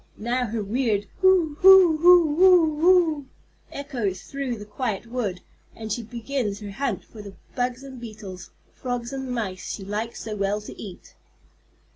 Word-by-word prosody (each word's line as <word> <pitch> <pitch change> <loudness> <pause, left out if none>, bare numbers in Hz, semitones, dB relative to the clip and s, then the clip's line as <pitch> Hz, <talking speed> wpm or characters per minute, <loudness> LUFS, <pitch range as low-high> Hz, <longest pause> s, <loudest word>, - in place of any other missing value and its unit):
Now 245 +2 -1
her 220 0 -3
weird 210 -1 0
"hoo 360 -6 +3
hoo 375 -4 +8
hoo 340 -2 +6
oo 325 -5 +5
oo" 335 -6 +4 0.5
echoes 235 -10 -4
through 275 -4 -4
the 210 - -9
quiet 210 0 -4
wood, 230 -6 -4 0.3
and 220 -1 -7
she 240 - -3
begins 235 -2 -4
her 205 -2 -8
hunt 275 +7 -3
for 220 - -12
the 200 -1 -11 0.2
bugs 250 +1 -2
and 265 -3 -10
beetles, 210 -5 -9 0.2
frogs 245 -1 -5
and 265 -1 -5
mice 205 -7 -4
she 195 - -10
likes 215 +3 -4
so 215 -1 -5
well 200 +1 -1
to 210 - -10
eat. 190 -4 -11
240 Hz, 160 wpm, -24 LUFS, 210-280 Hz, 0.5 s, hoo